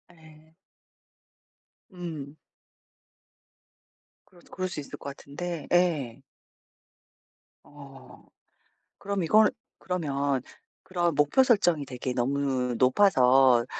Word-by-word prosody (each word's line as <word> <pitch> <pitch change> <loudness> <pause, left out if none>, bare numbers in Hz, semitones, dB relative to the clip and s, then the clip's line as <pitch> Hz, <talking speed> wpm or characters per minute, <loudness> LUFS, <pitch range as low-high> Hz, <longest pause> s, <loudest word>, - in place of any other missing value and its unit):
네. 160 0 -19 1.4
예. 165 -6 -7 2.0
그럴 175 -3 -21
그럴 185 0 -3
수 175 - -6
있을 145 - -8
것 140 - -7
같은데 165 +4 -7
예. 150 -9 +1 1.4
어. 140 -2 -15 0.7
그럼 200 -2 -3
이건 215 +6 +5 0.3
그러면 140 -7 -2 0.4
그런 175 -3 -1
목표 145 - +4
설정이 175 - +2
되게 125 0 -5
너무 130 -1 -1
높아서 130 -5 +4
150 Hz, 155 characters per minute, -27 LUFS, 135-175 Hz, 2.0 s, 이건